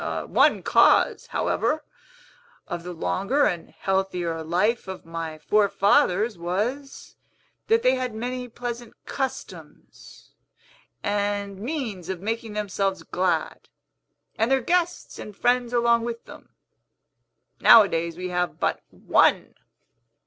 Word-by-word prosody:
One -, -, +3 dB
cause, -, -, +4 dB
however, 310 Hz, +1 st, -1 dB, 0.8 s
of 175 Hz, -2 st, -4 dB
the 180 Hz, +1 st, -7 dB
longer 195 Hz, -, 0 dB
and 170 Hz, -2 st, -2 dB
healthier 180 Hz, -4 st, -2 dB
life 190 Hz, +9 st, 0 dB
of 190 Hz, -2 st, -7 dB
my 165 Hz, -1 st, -5 dB
forefathers 200 Hz, +2 st, +2 dB
was, 225 Hz, +11 st, -4 dB, 0.5 s
that 455 Hz, +1 st, +3 dB
they 255 Hz, -, +4 dB
had 255 Hz, -3 st, -3 dB
many 250 Hz, +2 st, -4 dB
pleasant 240 Hz, 0 st, -6 dB
customs, 265 Hz, -1 st, -7 dB, 0.7 s
and 205 Hz, -1 st, -2 dB
means 225 Hz, -, -4 dB
of 190 Hz, -2 st, -3 dB
making 225 Hz, +2 st, -4 dB
themselves 195 Hz, -2 st, -2 dB
glad, 180 Hz, 0 st, -2 dB, 0.7 s
and 225 Hz, +2 st, +2 dB
their 270 Hz, 0 st, +3 dB
guests 350 Hz, +5 st, -1 dB
and 210 Hz, -2 st, -9 dB
friends 245 Hz, -1 st, +1 dB
along 235 Hz, -1 st, +3 dB
with 235 Hz, 0 st, -5 dB
them. -, -, -13 dB, 1.1 s
Nowadays 170 Hz, -6 st, +5 dB
we 180 Hz, 0 st, -4 dB
have 180 Hz, 0 st, -2 dB
but -, -, 0 dB
one!" -, -, +2 dB
205 Hz, 115 wpm, -24 LUFS, 180-245 Hz, 1.1 s, Nowadays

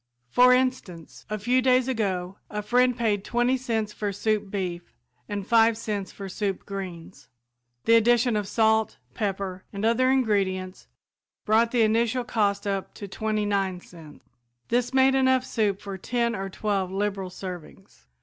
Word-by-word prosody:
For 250 Hz, 0 st, +6 dB
instance, 250 Hz, -10 st, -1 dB
a 215 Hz, -, -2 dB
few 245 Hz, +5 st, +2 dB
days 255 Hz, 0 st, +3 dB
ago 195 Hz, -6 st, -2 dB
a 210 Hz, 0 st, -4 dB
friend 250 Hz, +3 st, +2 dB
paid 210 Hz, -5 st, 0 dB
twenty 240 Hz, +3 st, +1 dB
cents 225 Hz, -5 st, -2 dB
for 205 Hz, -1 st, -3 dB
soup 210 Hz, 0 st, -1 dB
beef, 180 Hz, -3 st, -5 dB, 0.3 s
and 205 Hz, -2 st, -3 dB
five 225 Hz, 0 st, +4 dB
cents 205 Hz, -4 st, -4 dB
for 195 Hz, -, -8 dB
"soup 195 Hz, 0 st, -3 dB
greens." 190 Hz, -3 st, -8 dB, 0.6 s
The 230 Hz, -, +4 dB
addition 240 Hz, +1 st, +4 dB
of 210 Hz, -2 st, -1 dB
salt, 220 Hz, 0 st, +2 dB, 0.2 s
pepper 195 Hz, -2 st, -3 dB
and 200 Hz, +2 st, -3 dB
other 245 Hz, +3 st, +3 dB
ingredients 195 Hz, -7 st, 0 dB, 0.6 s
brought 225 Hz, +2 st, +3 dB
the 235 Hz, -1 st, +2 dB
initial 230 Hz, +3 st, +1 dB
cost 210 Hz, -5 st, 0 dB
up 195 Hz, -1 st, -3 dB
to 200 Hz, -, -7 dB
twenty 215 Hz, +2 st, -2 dB
nine 195 Hz, -3 st, 0 dB
cents. 165 Hz, -4 st, -15 dB, 0.4 s
This 245 Hz, +1 st, +1 dB
made 265 Hz, 0 st, +4 dB
enough 260 Hz, -1 st, +3 dB
soup 205 Hz, -5 st, 0 dB
for 195 Hz, -2 st, -7 dB
ten 235 Hz, +3 st, -1 dB
or 195 Hz, 0 st, -4 dB
twelve 195 Hz, -1 st, -1 dB
liberal 195 Hz, -1 st, -2 dB
servings. 180 Hz, -2 st, -10 dB
210 Hz, 155 wpm, -25 LUFS, 195-235 Hz, 0.6 s, For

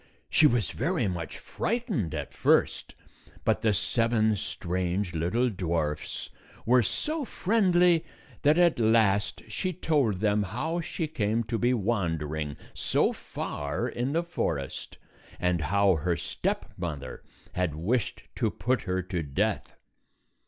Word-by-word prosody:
She 155 Hz, -, +6 dB
was 120 Hz, -6 st, +1 dB
very 140 Hz, -, 0 dB
much 85 Hz, -4 st, -4 dB
frightened 195 Hz, -, -2 dB
at 75 Hz, -3 st, -5 dB
first, -, -, +2 dB, 0.5 s
but -, -, +2 dB
the 110 Hz, -, +3 dB
seven 110 Hz, +1 st, +2 dB
strange 90 Hz, 0 st, -2 dB
little 90 Hz, +10 st, +1 dB
dwarfs 80 Hz, -5 st, -2 dB, 0.3 s
were 125 Hz, +2 st, +5 dB
so 305 Hz, -, -1 dB
friendly 180 Hz, -7 st, +3 dB, 0.4 s
that 150 Hz, +2 st, +4 dB
at 175 Hz, -6 st, +4 dB
last 110 Hz, -3 st, +3 dB
she 185 Hz, -, -2 dB
told 150 Hz, -, +1 dB
them 105 Hz, 0 st, +2 dB
how 135 Hz, -, -2 dB
she 165 Hz, 0 st, -3 dB
came 115 Hz, -6 st, 0 dB
to 110 Hz, 0 st, -2 dB
be 125 Hz, +1 st, +3 dB
wandering 80 Hz, -9 st, -1 dB, 0.2 s
so -, -, +1 dB
far 75 Hz, +11 st, -4 dB
in 125 Hz, +2 st, -2 dB
the 165 Hz, +2 st, +1 dB
forest, 80 Hz, -, -3 dB, 0.4 s
and 90 Hz, -2 st, +1 dB
how 95 Hz, +3 st, +3 dB
her 85 Hz, +2 st, 0 dB
stepmother 80 Hz, -4 st, -4 dB, 0.3 s
had 90 Hz, -5 st, -1 dB
wished 105 Hz, +9 st, -1 dB
to -, -, +2 dB
put 125 Hz, -1 st, 0 dB
her 95 Hz, -1 st, -1 dB
to 90 Hz, -1 st, -3 dB
death. 70 Hz, -3 st, -1 dB
105 Hz, 130 wpm, -28 LUFS, 85-135 Hz, 0.5 s, She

